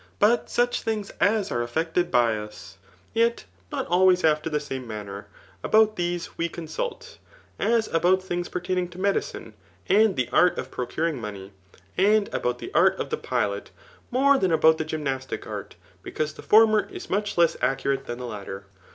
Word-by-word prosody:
But 225 +4 +3
such 245 0 +1
things 215 -3 -3
as 210 0 +2
are 120 - 0
effected 160 +8 -1
by 120 -2 +3
us, 105 -2 -9 0.3
yet 230 - +1 0.3
not - - -2
always 180 +1 +4
after 155 0 +2
the 150 -1 0
same 135 -4 -6
manner, 105 -2 -7 0.4
about 215 0 +4
these 175 -1 -3
we 170 0 0
ooo 170 0 -7
suit; 485 - -5 0.4
as 230 -1 +2
about 180 +3 +2
things 175 -1 -3
pertaim'ng 180 0 -2
to 180 - -11
medicine, 200 +1 -2 0.3
and 215 0 +4
the 130 -3 0
art 180 0 +4
of - - -5
procuring 150 +2 -2
money, 100 -2 -7 0.5
ai^ 210 +2 +3
about 125 0 -1
the - - -8
art - - +4
of - - -4
the - - 0
pilot 100 0 -2 0.4
more 275 +2 +4
than 190 -2 +1
about 160 0 +4
the 160 - -1
gymnastic 135 -4 -4
art, - - -7 0.3
because 155 0 -3
the - - -11
former 215 -2 +5
is - - -8
much 205 +1 -1
less 170 -1 +4
accurate 135 0 0
than 120 - -4
the 125 - -6
latter. 100 -3 -7
170 Hz, 175 wpm, -25 LUFS, 125-200 Hz, 0.5 s, former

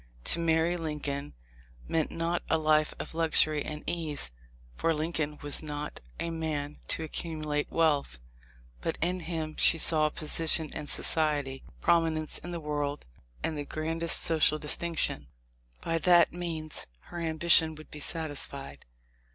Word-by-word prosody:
To - - +3
marry 165 +1 +2
Lincoln 150 -3 -4 0.5
meant 160 -2 0
not 165 +1 -1
a - - +3
life 155 -1 +3
of - - -7
luxury 155 -2 +3
and 150 0 -6
ease, 155 - -1 0.4
for 165 - +1
Lincoln 155 -1 -2
was 145 -1 0
not 150 -1 -5 0.2
a 170 - -2
man 155 -3 -3
to 160 - +4
ac 155 - -7
cumulate 155 -3 -3
wealth; 150 - +1 0.6
but - - -2
in 180 +3 0
him 160 -2 -4
she - - +5
saw 155 -1 +4
position 155 +1 +4
in 150 - -6
soci 155 +1 +2
ety, 135 -1 -9 0.2
prominence 165 -2 +2
in 175 - -9
the 175 -1 -4
world, 145 -1 -3 0.4
and 160 - -1
the 145 - -3
grandest 165 +3 0
so 165 - +1
cial 155 0 +3
distinction. 150 - -1 0.5
By 165 0 -1
that 175 0 +5
means 165 -3 -3 0.2
her 175 - -5
ambition 160 0 +4
would 155 0 -13
be 150 - -8
satisfied. 140 - -4
155 Hz, 150 wpm, -29 LUFS, 150-165 Hz, 0.6 s, she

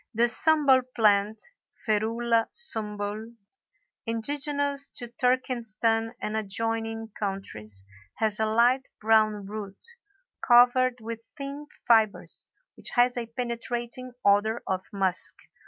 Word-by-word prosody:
The 230 - +3
Sumbul 280 0 +4
plant 210 -1 +3 0.5
(Ferula 225 +2 +1
Sumbul), 215 - -5 0.7
indigenous 280 +4 -1
to 240 - -6
Turkestan 235 -3 0
and 215 - -3
adjoining 225 +1 -2
countries, 150 - -5 0.3
has 215 -1 +1
a 220 - +2
light 240 +4 +3
brown 215 -2 +3
root 200 -1 -7 0.7
covered 245 0 +5
with 230 0 -6 0.2
thin 280 +1 -6 0.2
fibres, 220 -3 +2 0.3
which - - -6
has 245 0 +4
a 240 -2 -3
penetrating 240 +1 -4
odor 205 +3 +3
of 190 0 -1
musk. 190 -2 0
225 Hz, 105 wpm, -27 LUFS, 215-245 Hz, 0.7 s, covered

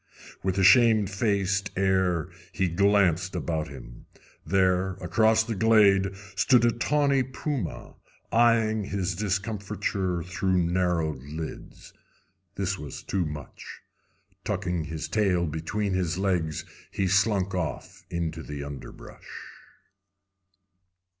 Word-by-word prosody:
With 95 0 -1
a 95 - +2
shamefaced 100 -2 +3
air 95 -4 +1 0.2
he 95 -1 +1
glanced 95 -1 +2
about 80 -2 -2
him. - - -12 0.4
There, 95 -1 +2
across 110 +5 +2
the 115 0 -3
glade, 100 -3 +4 0.2
stood 125 -3 +4
a 120 - +4
tawny 140 +3 +1
puma, 130 - -4 0.3
eyeing 115 -2 +3
his 95 -3 -2
discomfiture 100 -2 -2
through 90 +1 0
narrowed 85 -5 0
lids. 75 +4 -8 0.6
This 100 0 -2
was 75 -2 -8
too 90 -4 -1
much. 75 -1 -9 0.6
Tucking 90 -3 -2
his 80 -1 -5
tail 95 -5 +1
between 85 +6 -2
his 90 -2 -1
legs, 90 -5 -1 0.2
he 95 - -1
slunk 95 0 +2
off 80 -8 -4
into 80 -1 -3
the 75 -2 -6
underbrush. 70 -1 -10
95 Hz, 110 wpm, -26 LUFS, 85-105 Hz, 0.6 s, glade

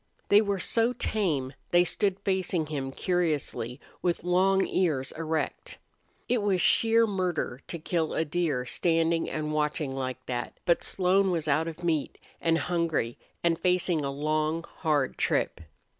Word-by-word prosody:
They 205 +1 +7
were 200 -2 0
so 230 +5 +2
tame 160 - -1 0.2
they 175 0 +5
stood 195 +2 0
facing 190 -4 0
him 140 -3 -4
curiously, 150 -8 -1 0.2
with 175 -2 0
long 190 +2 +3
ears 150 -8 0
erect. 160 0 -3 0.5
It 245 -3 +1
was 200 -3 +1
sheer 230 +4 +4
murder 180 - -2
to 170 - -4
kill 160 0 -1
a 160 - +1
deer 150 -5 -1
standing 165 +3 +1
and 155 0 -3
watching 150 -1 0
like 130 -1 -4
that, 120 -1 -4
but 170 -1 +3
Slone 190 +1 +2
was 165 -4 -1
out 155 +3 +2
of 165 +1 -7
meat 160 -4 0 0.2
and 165 -1 +3
hungry 165 -10 -1 0.2
and 170 -1 +2
facing 180 -3 +1
a 140 - -1
long, 155 +3 -1
hard 150 -5 0
trip. - - 0
165 Hz, 150 wpm, -28 LUFS, 150-185 Hz, 0.5 s, They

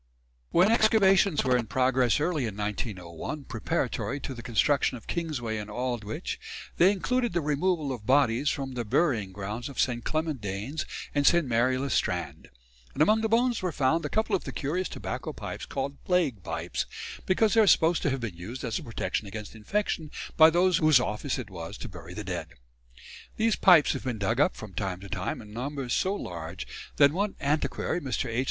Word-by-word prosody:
When 185 +5 +4
excavations 200 -6 +4
were 125 -1 +3
in 120 -2 0
progress 130 +2 +2
early 150 -5 0
in 105 -2 -6
1901, 105 - -4
preparatory 130 +3 -2
to 135 - -5
the 120 - -8
construction 125 +3 +2
of 115 - -15
Kingsway 135 -10 -3
and 105 0 -6
Aldwych, 120 -2 -3 0.4
they 185 +3 +6
included 240 +3 0
the 175 - +2
removal 150 0 0
of 115 -4 -8
bodies 135 0 +3
from 135 -1 -3
the 120 -1 -2
burying 115 - +1
grounds 105 +6 -5
of 140 - -8
St. 120 -2 +1
Clement 155 -5 -2
Danes 105 +10 -4 0.3
and 145 -1 +2
St. 170 -2 +5
Mary 125 +1 +2
le 135 0 -2
Strand; - - -1 0.5
and 150 - +4
among 215 +6 +4
the 220 - 0
bones 240 +1 +2
were 180 -2 -1
found 155 +3 +1
a - - -2
couple 220 -1 +1
of 185 - -2
the - - -5
curious 170 +6 -2
tobacco - - -5
pipes - - -6
called 140 +1 -4
"plague 165 - +1
pipes," 85 -1 -3 0.4
because 210 +3 +3
they 225 - +6
are 210 - +4
supposed 165 -2 +4
to - - +1
have 135 -1 -2
been 110 -7 -4
used 110 +11 -7
as 115 -3 -1
a - - -9
protection 105 -4 -3
against 105 +1 -7
infection 160 - -2 0.3
by 160 0 +8
those 175 +1 +3
whose 155 -4 +5
office 125 +3 -2
it 115 -6 -6
was 85 -3 -7
to - - -7
bury - - -10
the - - -5
dead. - - -4 0.9
These 225 -1 +2
pipes 175 -6 +6
have - - -6
been 125 -3 -2
dug 110 +4 0
up 150 - +3
from 105 -3 -9
time 90 0 -3
to 100 - -10
time 95 +5 -3
in 105 0 -13
numbers 130 +1 -3
so 190 +2 +1
large 85 - -6 0.3
that 140 -1 +6
one 195 +5 -1
antiquary, 150 +4 -1
Mr. 130 -4 -2
H. 115 +1 -1
135 Hz, 195 wpm, -28 LUFS, 110-170 Hz, 0.9 s, by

